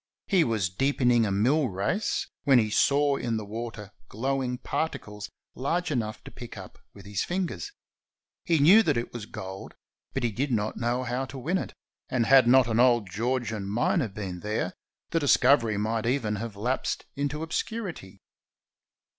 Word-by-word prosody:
He 185 -5 +3
was 105 -7 0
deepening 120 0 +2
a - - -1
mill 130 +8 +2
race, 100 - -1 0.2
when 135 -2 +5
he 110 -3 +2
saw 140 +4 +3
in 115 -2 -1
the 110 - -5
water 110 -1 -6 0.2
glowing 130 +2 -1
particles 105 -9 -4 0.2
large 165 +7 -1
enough' 110 -6 -2
to - - -10
pick 120 -1 -10
up - - -11
with 100 -1 -14
his 100 -1 -2
fin 185 +1 -1
gers. 410 - -7 0.7
He 170 -2 +2
knew 175 +10 +7
that 155 - +1
it 120 - -3
was 115 -3 -6
gold, 95 -2 -8 0.4
but 135 - -1
he 120 - +1
did 135 +6 -2
not 110 -2 0
know 120 +2 -1
how 125 +2 -2
to 135 - -9
win 165 +9 0
it, - - -6 0.3
and 125 -2 +1
had 130 -1 +6
not 130 0 +6
an 115 0 +1
old 120 -6 +4
Georgian 110 -1 -2
miner 120 - +1
been 95 -3 -6
there, 105 +3 -2 0.4
the 165 - +2
discovery 125 -6 +4
might 110 +2 -1
even 115 -5 0
have 110 0 -5
lapsed 120 +6 -2
into 145 +2 -2
obscurity. 165 - -5
120 Hz, 170 wpm, -27 LUFS, 105-140 Hz, 0.7 s, knew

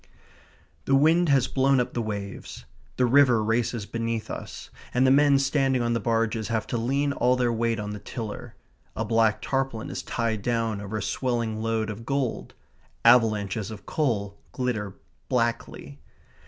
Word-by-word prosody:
The 135 - +3
wind 160 +4 +4
has 135 -3 +3
blown 135 0 +2
up 125 - -1
the 120 - -1
waves. 100 -3 -6 0.3
The 125 - +3
river 125 -3 +4
races 115 0 -1
beneath 115 0 -3
us, - - -8 0.2
and 125 +1 +4
the 130 - +5
men 140 0 +5
standing 135 -2 +1
on 120 0 0
the 115 - 0
barges 115 -1 0
have 115 -2 -1
to - - +1
lean 140 +4 0
all 125 -1 +2
their 125 -2 +1
weight 115 0 0
on 105 0 -4
the 105 - -6
tiller. 110 +1 -7 0.4
A 115 - -2
black 110 -1 +2
tarpaulin 135 -1 -2
is - - -4
tied 115 -3 -2
down 115 -2 -1
over 105 +2 -4
a 105 - -3
swelling 115 -4 -2
load 110 -1 -1
of 105 +2 -8
gold. 135 -1 -2 0.5
Avalanches 110 -4 +3
of 110 -2 -9
coal 105 -10 -1
glitter 110 -6 -2 0.3
blackly. 115 - -2
115 Hz, 165 wpm, -26 LUFS, 110-130 Hz, 0.5 s, the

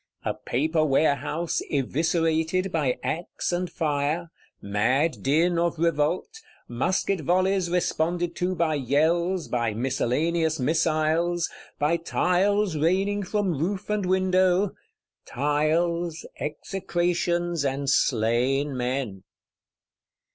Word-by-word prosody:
A - - 0
Paper 155 +5 0
Warehouse 150 +3 +1
eviscerated 160 +5 0
by 145 -7 0
axe 170 +3 -3
and 175 0 -2
fire: 155 +2 -1 0.3
mad 125 +11 0
din 165 +5 +2
of 170 0 0
Revolt; 170 - 0 0.3
musket 180 +9 0
volleys 185 +3 +1
responded 175 0 0
to 180 +1 -1
by 165 -2 +1
yells, 160 +6 +1
by 120 -3 -1
miscellaneous 150 +7 0
missiles; 160 +4 +1 0.3
by 150 +3 +2
tiles 185 +3 +1
raining 190 +6 +1
from 200 -2 -1
roof 190 +5 -2
and 205 -3 0
window,—tiles, 175 -3 0
execrations 175 0 -1
and 140 0 -2
slain 130 +3 +1
men! 125 -5 -2
165 Hz, 95 wpm, -25 LUFS, 145-175 Hz, 0.3 s, din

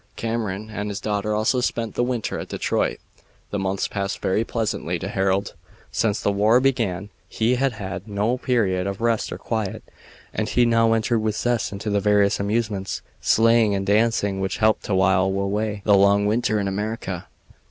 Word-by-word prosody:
Cameron 110 -2 -3
and 105 -1 -4
his 100 0 -4
daughter 105 0 -1
also 110 +4 +1
spent 115 -2 -2
the - - -1
winter 120 -3 -2
at - - -6
Detroit. - - -1 0.5
The 100 - -1
months 95 0 -1
passed 100 -1 -3
very 100 +4 +1
pleasantly 110 -7 -2
to 90 - -5
Harold. 95 -1 0 0.4
Since 105 -2 0
the 100 - +1
war 105 +4 +4
began 110 -8 0 0.2
he 115 +3 +1
had 130 0 +1
had 95 -2 -6
no 105 +4 0
period 100 -8 +1
of 100 0 -4
rest 115 -1 0
or - - -4
quiet, 110 -4 -3 0.5
and 110 -1 -2
he 125 - +3
now 115 -1 +3
entered 115 +1 +1
with 110 -1 -1
zest 120 +1 0
into 105 +2 -4
the 100 - +2
various 100 0 +3
amusements, 100 -1 -2 0.2
sleighing, 115 -2 +4
and 95 0 -2
dancing, 105 -1 +2
which 95 0 -2
helped 110 0 +2
to 100 - 0
while 95 0 +3
away 100 +2 -1
the 105 - +5
long 100 +1 +5
winter 110 0 +1
in 100 - -1
America. 100 -2 -4
105 Hz, 180 wpm, -23 LUFS, 100-115 Hz, 0.5 s, the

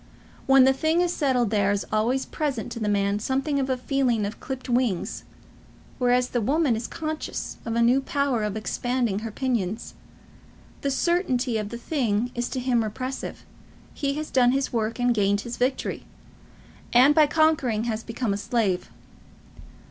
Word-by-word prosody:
When 270 -1 +7
the 265 +1 +5
thing 315 +5 +1
is 355 -1 +1
settled 250 -7 +1
there 200 -2 +2
is 200 -1 -1
always 235 +5 +1
present 275 -8 -3
to 230 - -5
the 210 -2 -1
man 200 0 +1
something 270 +5 0
of 270 0 -1
a 260 - +1
feeling 250 -4 0
of 205 - -6
clipped 265 -1 -6
wings; 240 -7 -1 0.7
whereas 250 0 +2
the 240 - -1
woman 275 +2 +2
is 225 +1 -4
conscious 310 -1 -5
of 230 -1 -2
a 235 - +3
new 250 +3 +4
power 280 -4 0
of 210 0 -2
expanding 240 -1 -1
her 225 +1 -5
pinions. 220 -4 -2 0.9
The 280 - 0
certainty 265 - +1
of 210 -1 -4
the 235 - -6
thing 240 -4 -1
is 240 0 -2
to 260 - -3
him 245 -2 +1
repressive. 255 +5 -5 0.5
He 280 -1 -2
has 305 0 -5
done 250 -1 +4
his 275 -1 -1
work, 225 -1 -1
and 245 0 +3
gained 205 -2 +2
his 235 +2 -6
victory, 260 +2 -1 0.9
and 255 +4 +6
by 305 -1 +5
conquering 295 -8 +2
has 225 -2 -2
become 230 -2 -2
a - - -2
slave. 205 -4 -1
245 Hz, 170 wpm, -25 LUFS, 220-270 Hz, 0.9 s, When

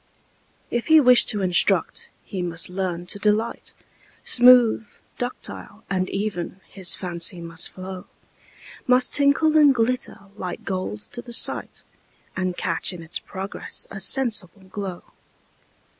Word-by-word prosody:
If 240 0 -2
he 315 -1 +7
wish 250 -4 +7
to 205 -2 0
instruct, 180 -2 +1
he 190 -3 -6
must 170 -1 -2
learn 180 -2 -3
to 200 - -1
delight, 215 +3 -1 0.5
Smooth, 245 -3 +5 0.3
ductile, 240 -3 -5
and 185 -1 -1
even, 195 -2 -4
his 190 -3 +2
fancy 175 0 -2
must 165 -1 +1
flow, 185 0 -9 0.8
Must 250 0 +3
tinkle 290 +2 +4
and 295 -3 +6
glitter 245 +2 -1 0.2
like 180 -4 -6
gold 185 - -4
to 240 - -5
the 240 0 -9
sight, - - +2 0.5
And 185 -1 -3
catch 165 +1 -1
in 170 -2 -9
its 160 - -5
progress 195 +1 -5
a 200 - -7
sensible 205 -3 +1
glow. 190 -1 -7
195 Hz, 130 wpm, -23 LUFS, 180-240 Hz, 0.8 s, he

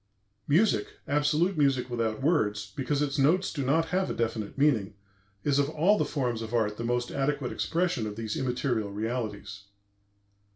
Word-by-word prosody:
Music, 220 - +2
absolute 150 +6 +2
music 135 -3 +2
without 115 0 -2
words, 105 - +1
because 140 +2 0
its 145 0 -2
notes 175 +8 +3
do 145 -4 -2
not 160 +5 +2
have 185 +1 0
a - - -3
definite 115 -1 -2
meaning, 115 -9 +2 0.5
is 145 -1 +2
of 140 0 +2
all 165 +7 +3
the - - +1
forms 125 -6 -2
of 115 +1 -4
art 105 -2 +1
the 115 - -4
most 120 +1 -1
adequate 140 -2 -1
expression 170 -10 -1
of 105 - -6
these 110 -1 -4
immaterial 125 -4 -1
realities. 105 -2 -4
130 Hz, 165 wpm, -28 LUFS, 110-150 Hz, 0.5 s, notes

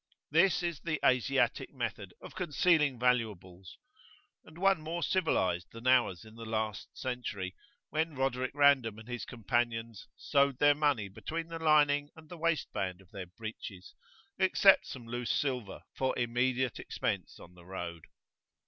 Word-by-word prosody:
This 175 +4 +4
is 170 -5 -2
the 155 -1 -2
Asiatic 125 -1 +2
method 115 -7 -4
of - - -10
concealing 160 -5 +2
valuables, 105 -7 -1 0.7
and 160 - -15
one 195 -2 +3
more 165 +2 -3
civilised 90 - +1
than 115 +2 -11
ours 120 -7 +3
in 110 - -14
the 115 0 -10
last 110 -2 -3
century, 110 -8 -4 0.4
when 160 0 -1
Roderic 130 -1 0
Random 140 -7 +4
and 110 +1 -12
his 125 -1 -5
companion 115 0 -1 0.2
"sewed 140 -2 +2
their 145 +1 +6
money 145 -8 +1
between 165 - -5
the 165 0 -5
lining 145 -2 +4
and 160 -1 -15
the 175 - -8
waist 165 -1 0
band 95 -3 -2
of 95 -1 -20
their 95 -3 -7
breeches, 95 -1 -9 0.5
except - - +5
some 125 -3 -8
loose 120 +1 -4
silver 125 -8 -2
for 130 0 -1
immediate 125 +1 0
[p.26]expense - - -3
on 90 - -14
the 90 -1 -17
road." 85 -3 -6
125 Hz, 150 wpm, -31 LUFS, 110-145 Hz, 0.7 s, their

